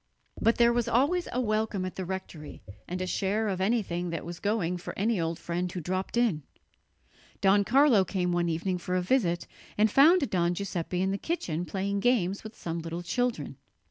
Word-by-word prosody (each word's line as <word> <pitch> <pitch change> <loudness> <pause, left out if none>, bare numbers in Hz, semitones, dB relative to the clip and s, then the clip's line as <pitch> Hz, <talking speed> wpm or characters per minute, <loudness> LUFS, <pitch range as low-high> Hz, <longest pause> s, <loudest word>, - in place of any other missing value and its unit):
But 230 - +4
there 235 0 +5
was 240 -1 0
always 285 +10 +2
a 250 - -1
welcome 215 -4 0
at 185 - -6
the 190 - -4
rectory 175 - -7 0.2
and 180 +1 -4
a - - -2
share 200 +4 0
of 190 -2 -2
anything 190 -5 0
that 165 -2 -4
was 175 +1 -7
going 200 -4 0
for 175 - -8
any 210 -1 +1
old 165 0 -2
friend 175 +1 -3
who 180 - -4
dropped 185 +6 -3
in. 225 -11 +2 1.0
Don 200 +1 +4
Carlo 250 -1 +5
came 180 -1 -1
one 175 -1 +1
evening 180 +3 -1
for 180 +1 -3
a 185 - +2
visit, 180 -6 +1 0.3
and 215 0 +4
found 300 - +6
Don 175 -1 +1
Giuseppe 180 -1 -2
in 190 - +1
the 200 - -2
kitchen 180 - -2
playing 200 +2 -2
games 200 -4 +1
with 220 0 -9
some 170 0 -4
little 165 +1 -5
children. 245 +6 -2
190 Hz, 195 wpm, -28 LUFS, 175-225 Hz, 1.0 s, found